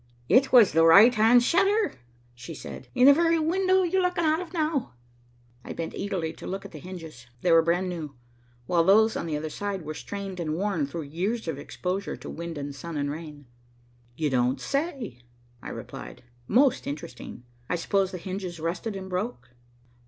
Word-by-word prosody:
"It 255 Hz, +8 st, +4 dB
was 235 Hz, -6 st, +7 dB
the 165 Hz, +1 st, +4 dB
right 200 Hz, +9 st, +8 dB
hand 230 Hz, +2 st, +5 dB
shutter," 395 Hz, -, +2 dB, 0.4 s
she 125 Hz, +7 st, -9 dB
said, -, -, -9 dB
"in 250 Hz, 0 st, +5 dB
the 280 Hz, -, +10 dB
very 335 Hz, +2 st, +3 dB
window 375 Hz, +4 st, +2 dB
you're 370 Hz, +2 st, +1 dB
looking 360 Hz, -1 st, 0 dB
out 315 Hz, 0 st, +2 dB
of 350 Hz, -3 st, -8 dB
now." 310 Hz, -, -1 dB, 0.7 s
I -, -, -7 dB
bent 165 Hz, -1 st, -5 dB
eagerly 180 Hz, -6 st, -3 dB
to -, -, -8 dB
look 195 Hz, +1 st, -5 dB
at -, -, -9 dB
the 155 Hz, -, -9 dB
hinges. 160 Hz, -8 st, -10 dB
They 180 Hz, -, +2 dB
were 165 Hz, 0 st, +7 dB
brand 175 Hz, +3 st, +1 dB
new, 160 Hz, -6 st, -5 dB, 0.5 s
while 170 Hz, +2 st, +2 dB
those 220 Hz, +5 st, +5 dB
on 170 Hz, -, -3 dB
the 155 Hz, -2 st, -1 dB
other 155 Hz, +1 st, -5 dB
side 200 Hz, -1 st, -4 dB
were 155 Hz, 0 st, -5 dB
strained 195 Hz, +2 st, -6 dB
and 155 Hz, -2 st, -2 dB
worn 180 Hz, -5 st, -1 dB
through 160 Hz, +3 st, -5 dB
years 180 Hz, +10 st, -3 dB
of 155 Hz, -4 st, -3 dB
exposure 185 Hz, +6 st, -4 dB
to -, -, -8 dB
wind 170 Hz, -1 st, -6 dB
and 145 Hz, 0 st, -5 dB
sun 165 Hz, +3 st, -7 dB
and 145 Hz, 0 st, -1 dB
rain. 150 Hz, -2 st, -8 dB, 0.7 s
"You 150 Hz, 0 st, -1 dB
don't 125 Hz, +1 st, +1 dB
say," 275 Hz, -, -3 dB, 0.4 s
I -, -, -7 dB
replied. -, -, -9 dB, 0.2 s
"Most 265 Hz, +1 st, +3 dB
interesting. 135 Hz, -4 st, -7 dB, 0.3 s
I -, -, +1 dB
suppose 190 Hz, +2 st, +1 dB
the 185 Hz, -, -6 dB
hinges 185 Hz, -1 st, -6 dB
rusted 175 Hz, +7 st, -3 dB
and 190 Hz, -1 st, -6 dB
broke." 180 Hz, -, -4 dB
185 Hz, 190 wpm, -26 LUFS, 160-245 Hz, 0.7 s, the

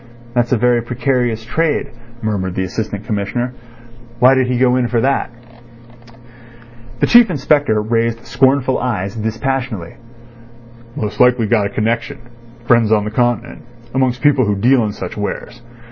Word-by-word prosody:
"That's 120 Hz, -1 st, 0 dB
a 125 Hz, -, +3 dB
very 120 Hz, +1 st, +2 dB
precarious 120 Hz, -2 st, -1 dB
trade," 160 Hz, +5 st, -1 dB, 0.3 s
murmured 95 Hz, -4 st, -2 dB
the 95 Hz, -, -1 dB
Assistant 100 Hz, +2 st, -4 dB
Commissioner. 120 Hz, +3 st, -2 dB, 0.6 s
"Why 125 Hz, +2 st, +6 dB
did 130 Hz, -1 st, +2 dB
he 125 Hz, -1 st, 0 dB
go 125 Hz, 0 st, +3 dB
in 125 Hz, -1 st, +1 dB
for 120 Hz, -1 st, 0 dB
that?" 135 Hz, +4 st, 0 dB, 1.7 s
The -, -, +3 dB
Chief 240 Hz, -2 st, +6 dB
Inspector 145 Hz, -7 st, +1 dB
raised 115 Hz, +1 st, -1 dB
scornful 130 Hz, -1 st, +2 dB
eyebrows 105 Hz, -6 st, -3 dB
dispassionately. 110 Hz, -3 st, -3 dB, 1.0 s
"Most 105 Hz, -8 st, -4 dB
likely 125 Hz, -2 st, +4 dB
got 105 Hz, -2 st, +1 dB
a -, -, -7 dB
connection—friends 120 Hz, 0 st, -2 dB
on 105 Hz, -1 st, +3 dB
the 105 Hz, -, -4 dB
Continent—amongst 120 Hz, +1 st, -2 dB
people 140 Hz, -5 st, +3 dB
who 105 Hz, -, +1 dB
deal 120 Hz, +5 st, +3 dB
in 105 Hz, -, -2 dB
such 95 Hz, -3 st, -7 dB
wares. 110 Hz, +3 st, -5 dB
120 Hz, 140 wpm, -17 LUFS, 110-130 Hz, 1.7 s, Why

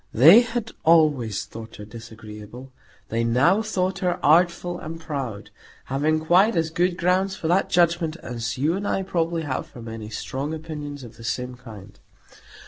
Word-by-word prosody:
They 165 Hz, -, +9 dB
had 235 Hz, -2 st, -4 dB
always 150 Hz, -, +3 dB
thought 115 Hz, 0 st, -10 dB
her 105 Hz, -, -9 dB
disagreeable; 110 Hz, +2 st, -11 dB, 0.4 s
they 115 Hz, +1 st, 0 dB
now 130 Hz, -, +3 dB
thought 190 Hz, -3 st, -1 dB
her 180 Hz, -2 st, 0 dB
artful 175 Hz, +2 st, +3 dB
and 165 Hz, +1 st, -7 dB
proud; 135 Hz, -10 st, -5 dB, 0.3 s
having 155 Hz, +4 st, 0 dB
quite 190 Hz, +7 st, +4 dB
as 165 Hz, -1 st, 0 dB
good 175 Hz, +2 st, 0 dB
grounds 185 Hz, +2 st, +1 dB
for 160 Hz, -, -4 dB
that 185 Hz, +3 st, +2 dB
judgment 170 Hz, -2 st, +2 dB
as 115 Hz, -1 st, -4 dB
you 150 Hz, +5 st, +1 dB
and 200 Hz, +1 st, -3 dB
I 195 Hz, -, 0 dB
probably 170 Hz, -3 st, -1 dB
have 140 Hz, -4 st, -3 dB
for -, -, -13 dB
many 110 Hz, -1 st, -7 dB
strong 135 Hz, +7 st, -4 dB
opinions 150 Hz, -3 st, -7 dB
of 120 Hz, -, -12 dB
the 115 Hz, -, -12 dB
same 125 Hz, +2 st, -3 dB
kind. 105 Hz, -5 st, -13 dB
155 Hz, 165 wpm, -24 LUFS, 115-175 Hz, 0.4 s, They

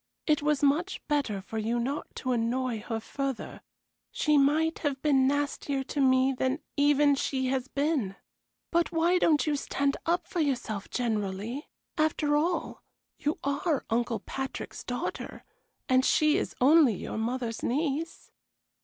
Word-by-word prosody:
It 300 Hz, -2 st, +2 dB
was 295 Hz, -1 st, +1 dB
much 320 Hz, +7 st, +2 dB
better 275 Hz, -10 st, 0 dB
for 220 Hz, +3 st, -5 dB
you 225 Hz, +2 st, 0 dB
not 270 Hz, +5 st, -2 dB
to 255 Hz, -, -2 dB
annoy 240 Hz, 0 st, 0 dB
her 225 Hz, +1 st, -4 dB
further; 270 Hz, +3 st, -4 dB, 0.5 s
she 300 Hz, -1 st, +2 dB
might 300 Hz, +3 st, +3 dB
have 285 Hz, -3 st, -1 dB
been 270 Hz, -3 st, +4 dB
nastier 285 Hz, -1 st, -1 dB
to 285 Hz, +2 st, -2 dB
me 260 Hz, 0 st, +4 dB
than 260 Hz, +2 st, 0 dB, 0.2 s
even 290 Hz, 0 st, +4 dB
she 265 Hz, -1 st, -1 dB
has 260 Hz, -1 st, -1 dB
been. 280 Hz, -9 st, -1 dB, 0.6 s
But 340 Hz, -1 st, +2 dB
why 345 Hz, +2 st, +3 dB
don't 305 Hz, -4 st, +3 dB
you 300 Hz, -2 st, +1 dB
stand 280 Hz, 0 st, -1 dB
up 345 Hz, +2 st, +1 dB
for 355 Hz, -, -4 dB
yourself 245 Hz, -9 st, -1 dB
generally? 220 Hz, +2 st, -2 dB, 0.3 s
After 305 Hz, -1 st, +2 dB
all, 335 Hz, +4 st, -1 dB, 0.4 s
you 295 Hz, +2 st, -1 dB
are 280 Hz, +1 st, 0 dB
Uncle 230 Hz, -2 st, 0 dB
Patrick's 265 Hz, +3 st, -5 dB
daughter, -, -, -5 dB, 0.4 s
and 255 Hz, 0 st, +4 dB
she 305 Hz, +2 st, +4 dB
is 395 Hz, -, -2 dB
only 275 Hz, -3 st, +6 dB
your 200 Hz, -, -5 dB
mother's 235 Hz, 0 st, -2 dB
niece." 300 Hz, +4 st, -2 dB
275 Hz, 145 wpm, -28 LUFS, 245-300 Hz, 0.6 s, only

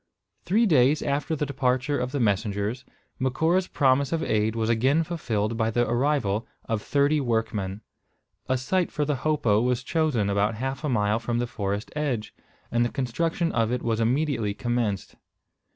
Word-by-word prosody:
Three 215 Hz, +7 st, +3 dB
days 150 Hz, -, +4 dB
after 145 Hz, +3 st, -1 dB
the 150 Hz, -, -1 dB
departure 130 Hz, 0 st, 0 dB
of 125 Hz, 0 st, -2 dB
the 140 Hz, -, -2 dB
messengers, 105 Hz, +2 st, 0 dB, 0.4 s
Macora's 160 Hz, +8 st, +1 dB
promise 135 Hz, -1 st, +2 dB
of 165 Hz, -1 st, 0 dB
aid 110 Hz, -2 st, +1 dB
was 110 Hz, -1 st, 0 dB
again 130 Hz, +8 st, +3 dB
fulfilled 115 Hz, -10 st, -2 dB
by 110 Hz, -1 st, +1 dB
the 120 Hz, +2 st, +1 dB
arrival 120 Hz, -4 st, 0 dB, 0.2 s
of 110 Hz, -2 st, -2 dB
thirty 145 Hz, +4 st, +2 dB
workmen. 110 Hz, -5 st, -1 dB, 0.7 s
A 130 Hz, -, +2 dB
site 175 Hz, +8 st, 0 dB
for 150 Hz, -, -1 dB
the 145 Hz, -1 st, 0 dB
hopo 125 Hz, -7 st, +2 dB
was 125 Hz, 0 st, 0 dB
chosen 150 Hz, -9 st, +1 dB
about 100 Hz, +2 st, +1 dB
half 135 Hz, +3 st, -4 dB
a 150 Hz, -, 0 dB
mile 105 Hz, -2 st, +1 dB
from 115 Hz, +1 st, -2 dB
the 120 Hz, -, 0 dB
forest 100 Hz, -2 st, -3 dB
edge, 135 Hz, -8 st, -2 dB, 0.4 s
and 120 Hz, 0 st, +2 dB
the 120 Hz, -, 0 dB
construction 165 Hz, +7 st, -1 dB
of 115 Hz, -1 st, +1 dB
it 125 Hz, 0 st, -2 dB
was 115 Hz, -1 st, 0 dB
immediately 115 Hz, -3 st, 0 dB
commenced. 120 Hz, -5 st, -2 dB
125 Hz, 170 wpm, -26 LUFS, 110-145 Hz, 0.7 s, days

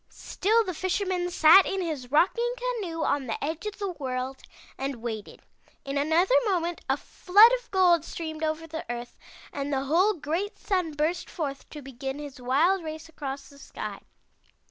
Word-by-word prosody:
"Still 445 Hz, +4 st, +1 dB
the 365 Hz, -, -3 dB
Fisherman 370 Hz, 0 st, -1 dB
sat 340 Hz, +2 st, +7 dB
in 390 Hz, -, -2 dB
his 305 Hz, -8 st, -4 dB
rocking 465 Hz, -, +2 dB
canoe 440 Hz, -10 st, -3 dB
on 280 Hz, -2 st, 0 dB
the 225 Hz, -, -3 dB
edge 320 Hz, +7 st, -3 dB
of 420 Hz, -, -5 dB
the 400 Hz, -3 st, -3 dB
world 265 Hz, -4 st, -4 dB, 0.3 s
and 270 Hz, 0 st, -3 dB
waited. 225 Hz, -3 st, -7 dB, 0.4 s
In 275 Hz, 0 st, -4 dB
another 320 Hz, +9 st, +2 dB
moment 345 Hz, -3 st, -1 dB
a -, -, +2 dB
flood 415 Hz, +6 st, +5 dB
of -, -, -25 dB
gold 355 Hz, -4 st, +4 dB
streamed 320 Hz, -1 st, -6 dB
over 315 Hz, +1 st, -1 dB
the 320 Hz, 0 st, -6 dB
earth 240 Hz, 0 st, -7 dB, 0.3 s
and 285 Hz, 0 st, -3 dB
the 270 Hz, -1 st, 0 dB
whole 360 Hz, +9 st, +3 dB
great 340 Hz, +7 st, -3 dB
Sun 365 Hz, -6 st, -1 dB
burst 310 Hz, +4 st, -1 dB
forth 280 Hz, -4 st, -5 dB
to 295 Hz, -2 st, -9 dB
begin 270 Hz, +1 st, -5 dB
his 285 Hz, -3 st, -9 dB
wild 325 Hz, +9 st, +2 dB
race 315 Hz, 0 st, -7 dB
across 280 Hz, -3 st, -6 dB
the 280 Hz, -1 st, -16 dB
sky. -, -, -7 dB
320 Hz, 170 wpm, -27 LUFS, 275-370 Hz, 0.4 s, sat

